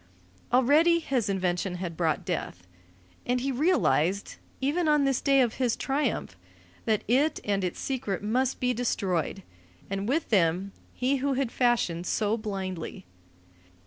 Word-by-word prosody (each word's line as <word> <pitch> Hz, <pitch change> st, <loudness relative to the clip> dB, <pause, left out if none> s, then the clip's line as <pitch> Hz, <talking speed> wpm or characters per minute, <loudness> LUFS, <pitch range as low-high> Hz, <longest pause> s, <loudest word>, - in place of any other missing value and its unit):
Already 295 Hz, +7 st, +5 dB
his 260 Hz, -9 st, -1 dB
invention 180 Hz, -1 st, -1 dB
had 175 Hz, -2 st, -5 dB
brought 160 Hz, -2 st, 0 dB
death. 90 Hz, +1 st, -4 dB, 0.6 s
And 250 Hz, +1 st, 0 dB
he 270 Hz, +2 st, -1 dB
realized 245 Hz, -, +1 dB, 0.2 s
even 310 Hz, +5 st, 0 dB
on 300 Hz, -1 st, +4 dB
this 270 Hz, -2 st, +1 dB
day 275 Hz, -1 st, +4 dB
of 240 Hz, -3 st, +1 dB
his 245 Hz, -3 st, +2 dB
triumph 270 Hz, -, -1 dB, 0.5 s
that 215 Hz, -2 st, +1 dB
it 275 Hz, +7 st, +2 dB
and 200 Hz, -2 st, 0 dB
its 180 Hz, -, -3 dB
secret 225 Hz, -8 st, -3 dB
must 250 Hz, +5 st, 0 dB
be 250 Hz, 0 st, +1 dB
destroyed, 195 Hz, -6 st, -1 dB, 0.5 s
and 195 Hz, +2 st, -2 dB
with 320 Hz, +5 st, 0 dB
them 185 Hz, -1 st, +2 dB, 0.2 s
he 265 Hz, +2 st, +1 dB
who 275 Hz, +1 st, 0 dB
had 260 Hz, -3 st, -1 dB
fashioned 230 Hz, -9 st, +1 dB
so 215 Hz, -1 st, +1 dB
blindly. 190 Hz, -, -5 dB
235 Hz, 145 wpm, -27 LUFS, 190-270 Hz, 0.6 s, Already